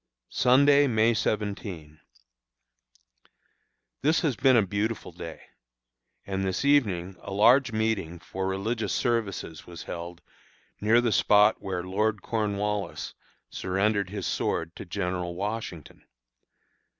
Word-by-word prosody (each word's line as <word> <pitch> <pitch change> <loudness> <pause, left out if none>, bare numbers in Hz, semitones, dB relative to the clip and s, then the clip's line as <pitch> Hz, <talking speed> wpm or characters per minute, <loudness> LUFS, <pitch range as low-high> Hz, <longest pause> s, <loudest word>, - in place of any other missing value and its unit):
Sunday, 140 +3 +5
May 115 -1 +3
17. 100 -8 -3 2.0
This 155 +4 +2
has 150 -7 0
been 130 +2 +4
a 110 - +5
beautiful 105 +4 -2
day, - - -9 0.8
and 95 0 -2
this 95 +7 -1
evening 100 -11 +2
a 100 - -8
large 120 +6 +5
meeting 110 -6 -1
for 95 +2 -5
religious 105 +4 -2
services 110 -9 -2
was 85 -3 -9
held 85 0 -7 0.6
near 110 +3 +4
the 120 -2 +1
spot 105 0 +4
where 90 -2 -3
Lord 105 +3 -1
Cornwallis 105 -2 -2 0.4
surrendered 100 +1 0
his 100 -2 -5
sword 85 0 -2
to - - -8
General 90 -1 -3
Washington. 100 -5 -5
105 Hz, 115 wpm, -27 LUFS, 90-115 Hz, 2.0 s, Sunday